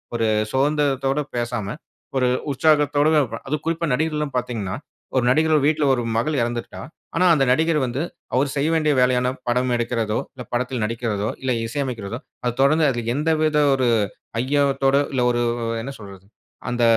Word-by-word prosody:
ஒரு 115 -1 +1 0.3
சோர்ந்திரத்தோட 135 0 +1 0.2
பேசாம, 120 -3 -2 0.5
ஒரு 130 -1 +2 0.2
உற்சாகத்தோடு 145 +1 +3 0.2
ப - - -1
அதுவும் 150 +2 -2
குறிப்பா 165 0 -1
நடிகர்கள்லாம் 150 0 -1
பார்த்தீங்கன்னா, 115 -6 -3 0.4
ஒரு 125 - +3
நடிகர் 155 +2 +3
வீட்ல 155 0 +2
ஒரு 125 - 0 0.2
மகள் 145 +5 0
இறந்துருக்கா. 120 0 -3 0.3
ஆனா 180 +2 +3
அந்த 145 -4 +3
நடிகர் 160 +3 +2
வந்து, 125 +3 -3 0.3
அவரு 135 +2 +2
செய்ய 145 +3 +1
வேண்டிய 155 -2 +2
வேலையான 125 0 +2 0.2
படம் 125 +1 +1
எடுக்கிறதோ, 115 -2 -1
இல்லை 125 - -8
படத்தில் 125 -1 -1
நடிக்கிறதோ, 110 -2 -2
இல்லை 130 -1 -1
இசை 120 +5 -3
அமைக்கிறதோ, 115 -3 -5 0.2
அத 120 -1 0
தொடர்ந்து 155 +3 +4
அதில் 120 -1 -2
எந்த 150 +3 +1
வித 155 -1 +2 0.2
ஒரு 130 -2 +1 0.5
ஐயத்தோட 140 0 +2
இல்லை. 130 - +1
ஒரு 120 0 0 0.2
வ் 115 0 -2
என்ன 135 +4 -6
சொல்றது, 95 -2 -12 0.4
அந்த 120 -1 0
130 Hz, 160 wpm, -22 LUFS, 120-150 Hz, 0.5 s, தொடர்ந்து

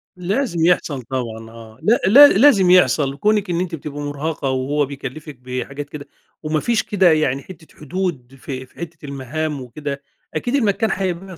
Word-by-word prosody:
لازم 180 -1 -1
يحصل 160 -6 +1
طبعًا 115 -3 -5
آه، 115 -1 -13
لا 230 +3 +3
لا 270 +10 +9
لازم 205 -6 +5
يحصل، 140 -5 +3
كونك 210 +1 +1
إن 170 0 0
أنتِ 180 -2 -2
بتبقى 145 -1 -7
مرهقة 145 0 -3
وهوّ 135 +3 0
بيكلفِك 140 +2 -8
بحاجات 130 +3 -6
كده، 145 -1 -9 0.4
وما 155 0 0
فيش 235 +4 0
كده 190 -4 +3
يعني 140 -4 +1
حتّة 170 -4 -13
حدود 150 -6 -4
في 130 -2 -6
في - - -29
حتّة 170 -2 -8
المهام 140 +2 -4
وكده، 140 +3 -6 0.3
أكيد 240 - -1
المكان 220 -3 +1
هيبقى 185 -1 -4
155 Hz, 165 wpm, -20 LUFS, 135-185 Hz, 0.4 s, لا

